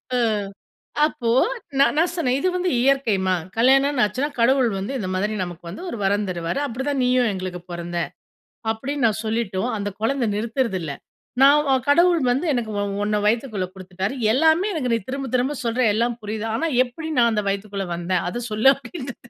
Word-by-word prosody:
அ. -, -, +2 dB, 0.9 s
அப்போ 240 Hz, -6 st, -2 dB, 0.5 s
நான் 275 Hz, -, +4 dB
நான் 335 Hz, +2 st, +3 dB
சொன்னேன். 265 Hz, -8 st, +1 dB
இது 370 Hz, -, +1 dB
வந்து 360 Hz, 0 st, 0 dB
இயற்கைம்மா. 230 Hz, -9 st, +2 dB, 0.2 s
கல்யாணம்ன்னு 270 Hz, +2 st, +4 dB
ஆச்சுன்னா, 255 Hz, +8 st, -1 dB
கடவுள் 250 Hz, +1 st, +4 dB
வந்து 195 Hz, +7 st, -4 dB
இந்த 195 Hz, -6 st, -3 dB
மாதிரி 205 Hz, +3 st, -1 dB
நமக்கு 175 Hz, -1 st, -7 dB
வந்து 190 Hz, -, -8 dB
ஒரு -, -, -5 dB
வரம் 205 Hz, +1 st, +1 dB
தருவாரு. 170 Hz, +7 st, -2 dB
அப்படிதான் 265 Hz, +2 st, -2 dB
நீயும் 250 Hz, -2 st, +3 dB
எங்களுக்கு 185 Hz, -2 st, -5 dB
பொறந்த, 175 Hz, 0 st, -4 dB, 0.7 s
அப்படின்னு 260 Hz, +4 st, -2 dB
நான் 220 Hz, 0 st, -1 dB
சொல்லிட்டும் 220 Hz, -1 st, -1 dB
அந்த 205 Hz, 0 st, -2 dB
குழந்தை 245 Hz, +1 st, +1 dB
நிறுத்துறதில்லை. 210 Hz, -, -2 dB, 0.5 s
நான் 290 Hz, +2 st, +6 dB
அ -, -, +5 dB
கடவுள் 340 Hz, +2 st, +5 dB
வந்து 270 Hz, +8 st, 0 dB
எனக்கு 235 Hz, -4 st, -2 dB
உ -, -, 0 dB, 0.2 s
உன்னை 210 Hz, 0 st, +1 dB
வயித்துக்குள்ள 220 Hz, -3 st, 0 dB
குடுத்துட்டாரு. 190 Hz, +3 st, -4 dB, 0.2 s
எல்லாமே 320 Hz, -, +3 dB
எனக்கு 265 Hz, -7 st, -1 dB
நீ 230 Hz, -, +2 dB
திரும்ப, 275 Hz, 0 st, -3 dB
திரும்ப 255 Hz, +3 st, +1 dB
சொல்ற 235 Hz, +2 st, 0 dB
எல்லாம் 235 Hz, +2 st, 0 dB
புரியுது. 215 Hz, +1 st, -4 dB
ஆனா, 290 Hz, +8 st, 0 dB, 0.2 s
எப்படி 315 Hz, +6 st, -7 dB
நான் 235 Hz, -1 st, +4 dB
அந்த 210 Hz, -1 st, 0 dB
வயித்துக்குள்ளே 195 Hz, -1 st, -3 dB
வந்தேன். 175 Hz, +1 st, -1 dB
அதை 240 Hz, +6 st, -4 dB
சொல்லு 215 Hz, +5 st, +5 dB
அப்படின்குது. 270 Hz, -5 st, -9 dB
235 Hz, 170 wpm, -22 LUFS, 200-270 Hz, 0.9 s, நான்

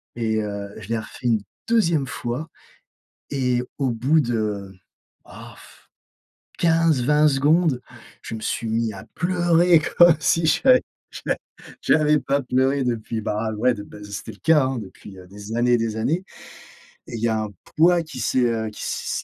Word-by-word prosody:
et 110 Hz, -2 st, 0 dB
heu, 100 Hz, -1 st, -5 dB
je 105 Hz, -1 st, -11 dB
l'ai 115 Hz, -, 0 dB
refait 110 Hz, +3 st, -6 dB
une 110 Hz, -4 st, +2 dB, 0.2 s
2e 170 Hz, -12 st, +2 dB
fois 125 Hz, +6 st, -4 dB, 0.8 s
et 125 Hz, -3 st, 0 dB, 0.2 s
au 135 Hz, -3 st, 0 dB
bout 130 Hz, +8 st, +2 dB
de, 105 Hz, -6 st, -2 dB, 0.5 s
oh -, -, -12 dB
pff, -, -, -18 dB, 0.7 s
15-20 155 Hz, -3 st, +3 dB
secondes, 145 Hz, 0 st, +2 dB, 0.4 s
je -, -, -7 dB
me 110 Hz, -, -6 dB
suis 115 Hz, +1 st, -3 dB
mis 115 Hz, 0 st, 0 dB
à 95 Hz, -, -10 dB
pleurer 175 Hz, -1 st, +3 dB, 0.2 s
comme 175 Hz, -2 st, +8 dB
si 165 Hz, +2 st, +2 dB
j'avais 255 Hz, +9 st, +4 dB, 1.0 s
j'av 155 Hz, -, +3 dB
ais 150 Hz, -, +1 dB
j'avais 150 Hz, -1 st, +4 dB
pas 140 Hz, +1 st, 0 dB
pleuré 130 Hz, +2 st, +1 dB
depuis, 115 Hz, -2 st, -2 dB
bah, 110 Hz, +1 st, -2 dB
ouais 125 Hz, +3 st, +2 dB
bah, 105 Hz, 0 st, -10 dB
c'était 100 Hz, -1 st, -7 dB
le -, -, -17 dB
cas, 155 Hz, -4 st, +4 dB
hein, 130 Hz, -1 st, -2 dB
depuis, 100 Hz, -2 st, -11 dB
heu, 90 Hz, -, -12 dB
des 105 Hz, +3 st, -7 dB
années 120 Hz, +1 st, +2 dB
et -, -, +6 dB
des 115 Hz, -1 st, -2 dB
années 150 Hz, +11 st, 0 dB, 0.9 s
et -, -, -10 dB
il 110 Hz, -, -5 dB
y 115 Hz, -, +2 dB
a 110 Hz, -1 st, 0 dB
un 105 Hz, -, -5 dB, 0.3 s
poids 170 Hz, +2 st, +5 dB
qui 155 Hz, -5 st, -9 dB
s'est, 125 Hz, +4 st, +1 dB
heu, 115 Hz, -2 st, -1 dB
qui 105 Hz, -, -10 dB
s -, -, -3 dB
125 Hz, 175 wpm, -23 LUFS, 110-155 Hz, 1.0 s, comme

